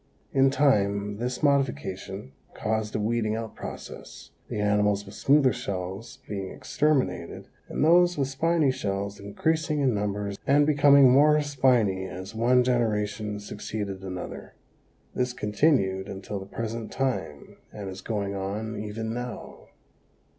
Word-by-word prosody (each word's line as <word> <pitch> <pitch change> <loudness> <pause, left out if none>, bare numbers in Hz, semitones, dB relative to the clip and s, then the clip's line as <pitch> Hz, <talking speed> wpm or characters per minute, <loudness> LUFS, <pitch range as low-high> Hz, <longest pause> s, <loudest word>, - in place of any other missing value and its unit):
In 135 0 +5
time 105 -7 +2
this 125 +4 -3
modification 105 - -1 0.2
caused 110 -1 -2
a - - +1
weeding 110 0 0
out 115 -1 -5
process, - - -9 0.2
the - - -4
animals 105 -1 +2
with 100 - -11
smoother 140 -2 +4
shells 100 -2 -5
being 95 -2 -4
exterminated 140 - -1 0.2
and - - 0
those 175 +1 +5
with 135 -2 +1
spiny 150 +1 +2
shells 100 -3 -3
increasing 155 - -1
in 135 -4 +2
numbers 100 -1 -2
and 145 +1 +5
becoming 140 -3 +6
more 150 +3 +6
spiny 125 -9 +2
as 95 +3 -8
one 125 +3 +3
generation 105 -4 0
succeeded 105 -1 -5
another. 90 -1 -7 0.6
This 125 -1 -1
continued 105 -4 +1
until 95 +1 -5
the 95 - -9
present 115 +1 -5
time 130 - -3
and 100 -2 -7
is 95 0 -7
going 100 -2 -2
on 105 +3 -4
even 110 +2 -4
now. 125 0 -7
110 Hz, 130 wpm, -26 LUFS, 100-135 Hz, 0.6 s, becoming